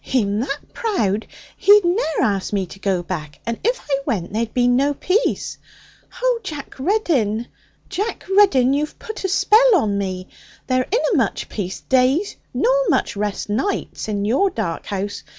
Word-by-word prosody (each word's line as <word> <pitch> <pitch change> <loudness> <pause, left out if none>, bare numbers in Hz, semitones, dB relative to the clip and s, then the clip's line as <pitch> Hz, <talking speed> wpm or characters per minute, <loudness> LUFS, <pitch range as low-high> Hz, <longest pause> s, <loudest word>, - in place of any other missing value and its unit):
'He'm 210 -6 0
that 275 +4 -2
proud, 220 - -1 0.3
he'd 410 -1 +6
ne'er 345 -3 +1
ask 200 -3 0
me 195 -2 +1
to 190 +2 -13
go 190 -3 0
back. 155 -5 -6
And 230 0 -3
if 485 +4 +1
I 275 -2 -1
went, 195 -8 -2
there'd 225 +1 -1
be 245 -1 +2
no 275 +4 +2
peace. 390 - 0 0.6
Oh, - - +2
Jack 300 -7 -7
Reddin, 265 - +1 0.4
Jack 400 +4 -3
Reddin! 275 -11 +5
You've 300 +2 -2
put 440 -2 -7
a 380 - 0
spell 440 +5 +5
on 210 - +1
me! 185 -1 -4 0.4
There 255 -1 +1
inna 470 +1 +1
much 255 - 0
peace, 190 -3 -4
days, 265 +9 +2 0.2
nor - - +2 0.2
much 265 -9 +1
rest, 205 0 -2
nights, 225 - -2
in 205 -1 -1
your 270 - +2
dark 170 - -4
house. 200 +1 -3
255 Hz, 165 wpm, -21 LUFS, -, 0.6 s, he'd